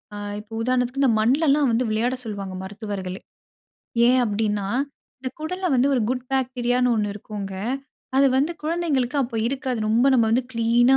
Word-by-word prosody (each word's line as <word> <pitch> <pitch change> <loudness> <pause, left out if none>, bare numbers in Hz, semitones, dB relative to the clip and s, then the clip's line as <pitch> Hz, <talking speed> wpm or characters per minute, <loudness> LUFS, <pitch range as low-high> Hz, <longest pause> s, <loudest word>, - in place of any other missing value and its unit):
அ - - -5 0.2
இப்ப 210 +1 -14
உதாரணத்துக்கு 250 +2 0
இந்த 260 - +5
மண்ல 265 +9 +3
எல்லாம் 285 -1 +4
வந்து 235 +2 +1
விளையாட 230 +4 +1
சொல்வாங்க. 200 -4 -5
மருத்துவர்களே, 195 -2 -5 0.9
ஏன் 255 +1 +5
அப்பிடின்னா, 210 -2 -1 0.5
இந்த 260 - -3
குடல்ல 365 +4 -3
வந்து 255 +2 +4
ஒரு 255 - +2
குட் 255 0 -2
பாக்டீரியான்னு 250 -1 +1
ஒண்ணு 205 -1 0
இருக்குங்க. 205 -2 -6 0.6
அது 275 - +6
வந்து 290 +6 +2
குழந்தைங்களுக்கு 305 -5 0
அப்ப 240 -2 -4
இருக்காது. 260 -2 -2
ரொம்ப 230 +4 +4
நம்ம 235 -3 +4
வந்து 240 +3 +2
கிளீனா 240 +3 +4
245 Hz, 160 wpm, -23 LUFS, 215-265 Hz, 0.9 s, அது